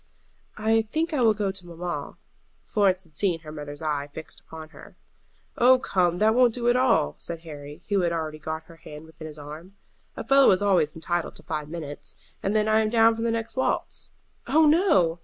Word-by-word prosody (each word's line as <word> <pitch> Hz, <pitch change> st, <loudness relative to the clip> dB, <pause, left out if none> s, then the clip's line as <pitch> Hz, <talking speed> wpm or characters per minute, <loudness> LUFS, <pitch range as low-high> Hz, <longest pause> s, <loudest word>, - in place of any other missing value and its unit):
"I 220 Hz, +1 st, +3 dB
think 315 Hz, +10 st, -2 dB
I 280 Hz, -, +1 dB
will 220 Hz, -3 st, +4 dB
go 205 Hz, -2 st, -1 dB
to 190 Hz, -2 st, -6 dB
mamma." 175 Hz, +1 st, -5 dB, 0.5 s
Florence 190 Hz, -3 st, +1 dB
had 165 Hz, -3 st, -26 dB
seen 170 Hz, 0 st, 0 dB
her 155 Hz, -1 st, -10 dB
mother's 145 Hz, 0 st, -8 dB
eye 145 Hz, -2 st, -1 dB
fixed 160 Hz, +2 st, -8 dB
upon 160 Hz, -1 st, -11 dB
her. -, -, -15 dB, 0.6 s
"Oh, 255 Hz, +2 st, +7 dB
come, 180 Hz, -8 st, +1 dB
that 215 Hz, +3 st, +4 dB
won't 245 Hz, -1 st, +4 dB
do 240 Hz, -1 st, -2 dB
at 240 Hz, -, +3 dB
all," 250 Hz, -, +3 dB
said 170 Hz, -1 st, -6 dB
Harry, 145 Hz, -2 st, -10 dB
who 200 Hz, -1 st, +2 dB
had 175 Hz, -2 st, +1 dB
already 155 Hz, -2 st, -3 dB
got 160 Hz, +1 st, -5 dB
her 165 Hz, 0 st, -16 dB
hand 150 Hz, 0 st, -11 dB
within 160 Hz, 0 st, -10 dB
his 155 Hz, -1 st, -10 dB
arm. 155 Hz, +6 st, -10 dB, 0.4 s
"A -, -, -4 dB
fellow 275 Hz, 0 st, +6 dB
is 185 Hz, -, +4 dB
always 180 Hz, -7 st, +2 dB
entitled 170 Hz, +1 st, -2 dB
to -, -, -11 dB
five 150 Hz, -2 st, -4 dB
minutes, 155 Hz, -3 st, -7 dB, 0.3 s
and 200 Hz, +2 st, -1 dB
then 215 Hz, 0 st, +2 dB
I 220 Hz, 0 st, +4 dB
am 215 Hz, -1 st, +1 dB
down 225 Hz, 0 st, +5 dB
for 225 Hz, -, -5 dB
the 230 Hz, -, +1 dB
next 230 Hz, 0 st, -2 dB
waltz." 260 Hz, -, -1 dB, 0.4 s
"Oh 315 Hz, +1 st, +5 dB
no!" 295 Hz, -, +3 dB
180 Hz, 210 wpm, -25 LUFS, 155-225 Hz, 0.6 s, Oh